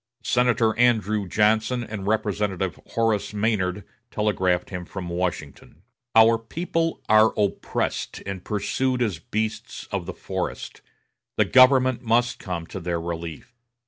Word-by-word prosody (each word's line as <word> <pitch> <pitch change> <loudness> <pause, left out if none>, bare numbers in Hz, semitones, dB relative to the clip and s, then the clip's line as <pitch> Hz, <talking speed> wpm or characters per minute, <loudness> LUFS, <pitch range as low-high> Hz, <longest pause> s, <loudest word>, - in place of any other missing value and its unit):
Senator 120 -3 +2
Andrew 110 -4 +2
Johnson 110 +4 +2
and 105 -3 -6
Representative 100 -4 -1
Horace 105 -3 0
Maynard 100 -3 0 0.3
telegraphed 95 -5 0
him 90 -1 -4
from 90 0 -7
Washington: 85 -2 -4 0.3
"Our 115 0 +6
people 165 +7 -2
are 110 +1 +5
oppressed 100 -2 -2
and 95 -2 -5
pursued 125 +5 -1
as 100 -8 -2
beasts 110 +5 -4
of - - -3
the - - -4
forest; - - -5 0.6
the - - +4
government 130 -1 +5
must 120 +1 +1
come 90 -3 -5
to 95 - -7
their 85 -1 -2
relief." 85 - -6
105 Hz, 125 wpm, -24 LUFS, 90-115 Hz, 0.6 s, Our